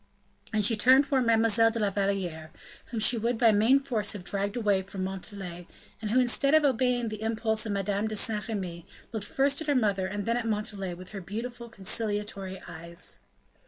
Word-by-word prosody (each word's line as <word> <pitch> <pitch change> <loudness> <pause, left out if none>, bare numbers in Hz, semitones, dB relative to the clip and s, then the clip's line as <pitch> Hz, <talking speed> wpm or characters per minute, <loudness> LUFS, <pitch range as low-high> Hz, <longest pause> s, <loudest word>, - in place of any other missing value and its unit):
And 215 -2 +2
she 225 - +4
turned 260 +6 +6
towards 265 -3 +1
Mademoiselle 225 0 +4
de 230 - -4
la 210 -3 +1
Valliere, 190 -5 -2 0.4
whom 230 - -4
she 225 +2 +3
would 235 +2 0
by 225 -1 +5
main 225 +6 +5
force 230 -7 0
have 200 -4 -7
dragged 200 +3 -2
away 205 -4 +2
from 190 0 -6
Montalais, 190 -2 -6 0.3
and 215 - -3
who 245 +4 +3
instead 275 +4 +3
of 310 -1 +5
obeying 250 -3 +1
the 215 -1 -7
impulse 220 0 +1
of - - -2
Madame 200 +1 -1
de 215 - -3
Saint 210 -1 0
Remy, 180 -6 -5 0.2
looked 220 -3 -3
first 280 0 +1
at 315 - -5
her 290 - +2
mother 200 -6 +1
and 205 +1 -4
then 230 +1 +1
at 235 -2 -2
Montalais 210 -4 -2
with 185 +1 -11
her 200 -2 -6
beautiful 235 +5 -6
conciliatory 205 -2 -2
eyes. 170 +2 -7
215 Hz, 195 wpm, -28 LUFS, 195-235 Hz, 0.4 s, turned